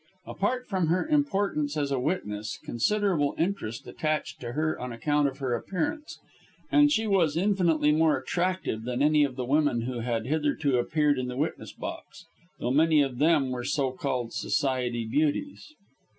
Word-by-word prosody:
Apart 250 Hz, +6 st, -2 dB
from 185 Hz, -5 st, 0 dB
her 180 Hz, -, +1 dB
importance 200 Hz, -, 0 dB
as 145 Hz, -2 st, -1 dB
a 135 Hz, -, +1 dB
witness, 110 Hz, -, -3 dB
considerable 175 Hz, -, 0 dB
interest 165 Hz, -, -2 dB
attached 155 Hz, -1 st, -2 dB
to 120 Hz, -1 st, -6 dB
her 155 Hz, +2 st, -1 dB
on 125 Hz, 0 st, -5 dB
account 145 Hz, +5 st, +1 dB
of 135 Hz, -1 st, -5 dB
her 130 Hz, -3 st, -2 dB
appearance 295 Hz, -, -3 dB, 0.7 s
she 250 Hz, -7 st, +1 dB
was 175 Hz, -7 st, +2 dB
infinitely 170 Hz, -6 st, +2 dB
more 155 Hz, -1 st, +3 dB
attractive 175 Hz, -3 st, -2 dB
than 125 Hz, +3 st, -1 dB
any 150 Hz, 0 st, +4 dB
of 135 Hz, -3 st, -1 dB
the 125 Hz, -1 st, -3 dB
women 145 Hz, -3 st, +2 dB
who 120 Hz, +1 st, -4 dB
had 115 Hz, -1 st, -2 dB
hitherto 145 Hz, -2 st, +1 dB
appeared 145 Hz, +2 st, +1 dB
in 125 Hz, -, -2 dB
the 125 Hz, 0 st, -5 dB
witness 150 Hz, +4 st, -3 dB
box -, -, -8 dB, 0.3 s
though 120 Hz, -, -2 dB
many 155 Hz, +1 st, +4 dB
of 130 Hz, -3 st, -4 dB
them 150 Hz, -4 st, +3 dB
were 125 Hz, -1 st, -3 dB
so 135 Hz, +1 st, 0 dB
called 130 Hz, -3 st, -3 dB
Society 125 Hz, -4 st, -1 dB
beauties. 155 Hz, -, -1 dB
150 Hz, 165 wpm, -27 LUFS, 125-170 Hz, 0.7 s, any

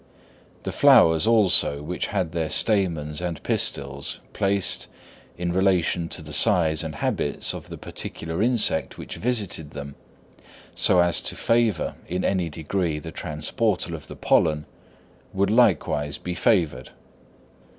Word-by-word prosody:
The -, -, -3 dB
flowers, 80 Hz, +4 st, +5 dB
also, 95 Hz, -10 st, +4 dB
which 90 Hz, +4 st, -3 dB
had 95 Hz, -5 st, -2 dB
their 80 Hz, -3 st, -2 dB
stamens 85 Hz, -6 st, 0 dB
and 85 Hz, -3 st, -4 dB
pistils 70 Hz, 0 st, -2 dB
placed, 100 Hz, -2 st, 0 dB, 0.5 s
in 85 Hz, 0 st, -2 dB
relation 90 Hz, -3 st, +1 dB
to 80 Hz, -, -5 dB
the 75 Hz, -1 st, -9 dB
size 85 Hz, -7 st, +2 dB
and 80 Hz, -2 st, -5 dB
habits 70 Hz, -, -2 dB
of -, -, -9 dB
the -, -, -7 dB
particular 80 Hz, +2 st, -5 dB
insect 115 Hz, -8 st, 0 dB
which -, -, -7 dB
visited 105 Hz, -10 st, -2 dB
them, 70 Hz, -1 st, -8 dB, 0.8 s
so 90 Hz, -, +4 dB
as 85 Hz, -1 st, +2 dB
to -, -, -2 dB
favour 115 Hz, -6 st, +1 dB
in 90 Hz, +2 st, -2 dB
any 90 Hz, -4 st, 0 dB
degree 80 Hz, +1 st, -2 dB
the 80 Hz, +2 st, -7 dB
transportal 85 Hz, +5 st, -2 dB
of 80 Hz, -3 st, -8 dB
the -, -, -9 dB
pollen, 75 Hz, -2 st, +2 dB, 0.7 s
would 100 Hz, +1 st, +1 dB
likewise 75 Hz, -, +2 dB
be 90 Hz, -, -5 dB
favoured. 85 Hz, -, +1 dB
85 Hz, 135 wpm, -24 LUFS, 75-100 Hz, 0.8 s, flowers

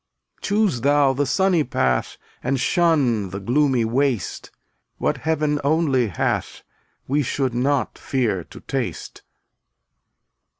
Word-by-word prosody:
Choose 205 Hz, -, +1 dB
thou 140 Hz, 0 st, +3 dB
the 140 Hz, +1 st, -1 dB
sunny 190 Hz, 0 st, +2 dB
path 125 Hz, -, -1 dB, 0.3 s
And 135 Hz, +1 st, 0 dB
shun 135 Hz, -, +2 dB
the 95 Hz, +2 st, -5 dB
gloomy 125 Hz, +3 st, +2 dB
waste; 125 Hz, -3 st, -1 dB, 0.5 s
What 150 Hz, -, 0 dB
Heaven 150 Hz, +1 st, 0 dB
only 140 Hz, -5 st, +2 dB
hath 95 Hz, -, -2 dB, 0.4 s
We 145 Hz, +3 st, +1 dB
should 130 Hz, -1 st, -1 dB
not 135 Hz, +3 st, 0 dB
fear 115 Hz, -9 st, -1 dB
to -, -, -13 dB
taste. -, -, -4 dB
135 Hz, 115 wpm, -22 LUFS, 120-150 Hz, 0.5 s, thou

